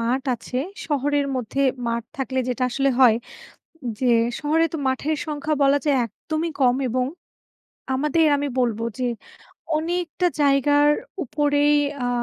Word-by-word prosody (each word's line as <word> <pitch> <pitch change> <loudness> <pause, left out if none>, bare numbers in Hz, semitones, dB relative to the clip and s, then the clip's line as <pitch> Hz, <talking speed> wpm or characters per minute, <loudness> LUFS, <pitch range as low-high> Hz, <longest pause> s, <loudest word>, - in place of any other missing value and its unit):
মাঠ 245 +3 0
আছে। 240 +2 -7 0.3
শহরের 290 -1 0
মধ্যে 255 +3 -2 0.2
মাঠ 235 0 -1
থাকলে 260 -1 -2
যেটা 250 +1 -2
আসলে 275 +2 +1
হয়, 245 -4 +7 0.8
যে 260 - 0 0.3
শহরে 315 +2 +2
তো - - -2
মাঠের 295 +4 -1
সংখ্যা 305 0 -2
বলা 280 +1 +4
যায় 285 -3 +3
একদমই 315 +9 -4
কম। 250 -1 +4
এবং 250 +2 0 0.9
আমাদের 300 +4 +2
আমি 285 0 -2
বলবো 230 -2 0
যে 255 - 0 0.7
অনেকটা 345 +2 -1
জায়গার 290 +1 +4 0.3
উপরেই 290 +2 +2 0.3
আ - - 0
280 Hz, 130 wpm, -23 LUFS, 255-295 Hz, 0.9 s, হয়